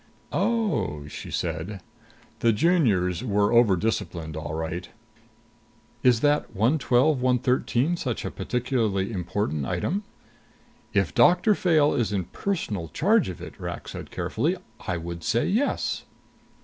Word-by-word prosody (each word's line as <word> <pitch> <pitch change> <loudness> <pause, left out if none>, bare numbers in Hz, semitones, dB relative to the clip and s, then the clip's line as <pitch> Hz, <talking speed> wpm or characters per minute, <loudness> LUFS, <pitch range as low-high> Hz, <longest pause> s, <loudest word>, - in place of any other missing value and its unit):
"Oh," 120 - 0
she - - -8
said. 85 +5 -3 0.6
The 115 - +4
Juniors 105 - +2
were 105 -3 +2
overdisciplined, 95 -7 +1
all 80 -1 -4
right. 80 +2 -4 1.1
"Is 120 -2 +4
that 145 -5 +1
112 130 +4 +3
113 125 +4 +1
such 125 -8 -3
a - - -3
particularly 115 -6 -1
important 90 - -2
item?" 200 - -1 0.9
"If - - +1
Doctor 180 +5 +5
Fayle 160 -6 +3
is 120 -7 0
in 100 -2 0
personal 100 - -3
charge 205 - +2
of 90 - -7
it," - - -10
Rak - - -6
said - - -7
carefully, - - -1 0.3
"I 90 - 0
would 85 0 -6
say 120 - +1
yes." 235 +9 0
115 Hz, 125 wpm, -25 LUFS, 90-145 Hz, 1.1 s, Doctor